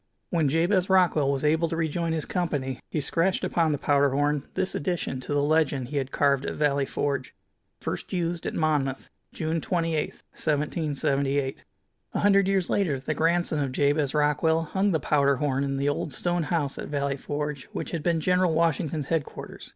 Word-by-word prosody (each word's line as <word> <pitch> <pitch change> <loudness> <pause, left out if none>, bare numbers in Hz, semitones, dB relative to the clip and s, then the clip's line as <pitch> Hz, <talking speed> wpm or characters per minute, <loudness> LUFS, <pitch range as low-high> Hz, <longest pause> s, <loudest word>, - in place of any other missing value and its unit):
When 160 -5 +2
Jabez 175 +5 +2
Rockwell 175 -7 +4
was 140 +1 -1
able 160 +2 +2
to 165 - -2
rejoin 165 +1 -1
his 160 -2 -1
company 145 -8 -2
he 155 - -1
scratched 170 +6 +1
upon 165 -2 +1
the 145 - 0
powder 140 0 +3
horn 145 +1 0
this 185 0 0
addition 165 -5 -2
to 130 - -7
the 145 - +2
legend 145 -4 +1
he 145 - -3
had 135 -2 -1
carved 140 -1 +2
at - - -3
Valley 140 -2 +1
Forge: 140 -5 -2 0.4
First - - -5
Used 170 -2 -2
at - - -3
Monmouth 145 -4 0 0.2
June 160 0 -2
28, 165 -3 0 0.2
1778. 140 -3 -1 0.5
A - - +1
hundred 200 -1 +4
years 195 -2 +1
later 160 -10 +1
the 135 +4 -2
grandson 165 0 +1
of 140 -2 -1
Jabez 145 +1 +1
Rockwell 150 +2 +2
hung 190 +5 0
the 165 -5 +1
powder 140 -1 +2
horn 140 -1 0
in 135 -1 -1
the 140 +1 0
old 145 0 -2
stone 175 0 0
house 145 -4 -1
at - - -5
Valley 140 -1 -1
Forge 145 0 -4
which - - -5
had 170 - -2
been 170 +1 +1
General 180 0 +2
Washington's 160 -2 0
headquarters. 160 -1 -4
150 Hz, 180 wpm, -26 LUFS, 140-170 Hz, 0.5 s, Rockwell